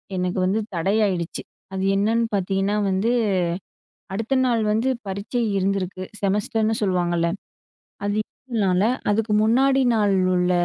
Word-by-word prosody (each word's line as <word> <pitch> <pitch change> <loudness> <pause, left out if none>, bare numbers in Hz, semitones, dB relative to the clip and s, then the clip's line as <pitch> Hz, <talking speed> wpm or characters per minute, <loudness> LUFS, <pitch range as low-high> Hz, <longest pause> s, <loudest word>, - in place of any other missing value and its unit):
எனக்கு 180 +1 -1
வந்து 195 +4 +1 0.2
தடையாயிடுச்சு. 190 -1 0 0.3
அது 190 0 -2
என்னன்னு 225 +3 +2
பாத்தீங்கன்னா, 195 +1 0
வந்து 190 +5 +1 1.0
அடுத்த 225 +6 -2
நாள் 235 -3 +2
வந்து 225 +5 +1 0.2
பரீட்சை 200 +5 -3 0.2
இருந்திருக்கு, 190 -1 -1 0.2
செமஸ்டர்னு 210 +2 +1
சொல்லுவாங்கல்ல, 175 -3 +1 0.8
அது 205 0 0
இருந்தனால, 205 -8 -1 0.3
அதுக்கு 215 +1 0
முன்னாடி 265 +5 +3
நாள் 205 -3 +2 0.2
உள்ள 180 0 +1
200 Hz, 115 wpm, -23 LUFS, 185-220 Hz, 1.0 s, முன்னாடி